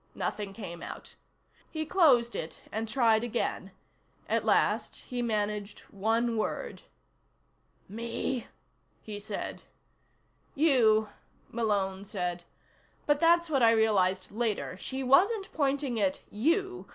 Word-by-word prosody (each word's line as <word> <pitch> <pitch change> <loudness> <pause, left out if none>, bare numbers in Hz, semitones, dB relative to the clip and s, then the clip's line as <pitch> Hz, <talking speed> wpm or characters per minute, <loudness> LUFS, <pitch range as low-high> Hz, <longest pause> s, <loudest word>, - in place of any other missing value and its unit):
Nothing 205 -2 -3
came 185 -5 -8
out. - - -9 0.6
He 315 -1 -3
closed 275 -9 +4
it 160 - -6
and 220 +1 -3
tried 225 -2 +3
again. 240 - -2 0.6
At - - +1
last - - +2
he 245 -1 -5
managed 210 -2 -2
one 225 +3 0
word. 215 - -3 1.1
"Me?" 235 +3 -3 0.6
he 210 -2 -6
said. 205 - -5 0.9
"You," 230 -8 +4 0.4
Malone 200 -4 -1
said. 180 -3 -4 0.6
"But 295 -1 +2
that's 340 +1 +4
what 280 -5 +1
I 230 - +7
realized 195 -5 +2
later. 220 -4 -2
She 265 +8 -5
wasn't 385 - +3
pointing 275 -4 0
at 190 -2 0
you. 365 - 0
225 Hz, 115 wpm, -29 LUFS, 205-270 Hz, 1.1 s, I